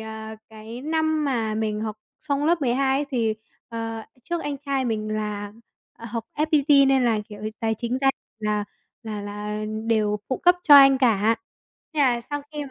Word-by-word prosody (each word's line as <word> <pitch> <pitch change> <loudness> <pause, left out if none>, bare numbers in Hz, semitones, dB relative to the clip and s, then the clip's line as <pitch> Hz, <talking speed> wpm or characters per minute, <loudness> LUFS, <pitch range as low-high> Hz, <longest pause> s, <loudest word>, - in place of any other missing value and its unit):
à, 220 0 -7
cái 220 +2 -9
năm 315 0 0
mà 230 -6 0
mình 215 -1 -1
học 215 -1 -4 0.2
xong 285 -1 -1
lớp 335 +2 +2
12 265 +1 +2
ấy 290 - -2
thì, 230 -4 +1 0.3
ờ, 225 -1 -4 0.2
trước 345 +5 -3
anh 290 -1 -3
trai 275 -2 -1
mình 215 -3 -2
là, 210 -1 -4 0.5
ờ, - - -11
học 230 -1 -3
FPT 295 -2 +4
nên 265 -2 +3
là, 225 -3 +2
kiểu, 210 -1 -10 0.2
tài 225 -1 0
chính 240 +2 -2
gia 270 - 0 0.3
là 210 -1 -1 0.4
là 215 -2 -5
là, 210 +1 -5
ờ, - - -3 0.2
đều 215 -2 +2
phụ 260 - 0
cấp 355 0 +5
cho 295 - +8
anh 275 -1 +8
cả. 225 -3 +3 0.6
Thế 305 - +1
là 245 -4 +3
sau 290 +4 -5
khi 300 -1 -4
mà 275 - -11
235 Hz, 195 wpm, -24 LUFS, 215-280 Hz, 0.6 s, cho